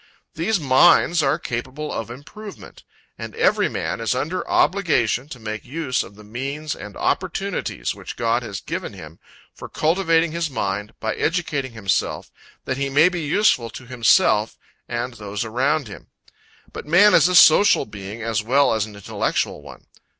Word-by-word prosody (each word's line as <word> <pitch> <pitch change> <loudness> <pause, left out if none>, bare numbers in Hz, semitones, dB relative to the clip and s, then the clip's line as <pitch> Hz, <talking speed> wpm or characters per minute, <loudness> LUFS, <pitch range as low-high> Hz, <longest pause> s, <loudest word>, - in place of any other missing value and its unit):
These 190 +6 0
minds 160 +4 +4
are 135 -2 +2
capable 130 +5 -5
of 115 - -4
improvement; 190 - -11 0.4
and - - -7
every - - +2
man - - -3
is 115 +2 0
under 155 +8 -2
obligation 145 - +1
to 125 - -9
make 110 -1 -6
use 135 -1 -2
of 100 - -10
the 105 - -14
means 140 +8 -5
and 105 0 -10
opportunities - - -2
which - - -9
God 115 +1 0
has 105 -6 -6
given - - -5
him - - -12 0.3
for - - -10
cultivating 165 0 +1
his 170 -1 -2
mind, 105 -3 -3
by 110 - -2
educating 150 -7 -2
himself, 100 -4 -2 0.3
that 130 - -2
he 140 0 -1
may 145 +6 +5
be 175 -2 -4
useful 150 - +2
to 125 - -10
himself 115 -3 +2 0.3
and 120 +1 -3
those 105 -1 -5
around 135 +5 0
him. 100 - -11 0.7
But - - -8
man 190 +6 +6
is - - +6
a 180 - 0
social 170 -1 +6
being 105 +1 -8
as 115 -1 -1
well 135 +5 +3
as 110 -1 -1
an 105 - -12
intellectual 100 - -2
one. - - -13
130 Hz, 165 wpm, -22 LUFS, 110-160 Hz, 0.7 s, man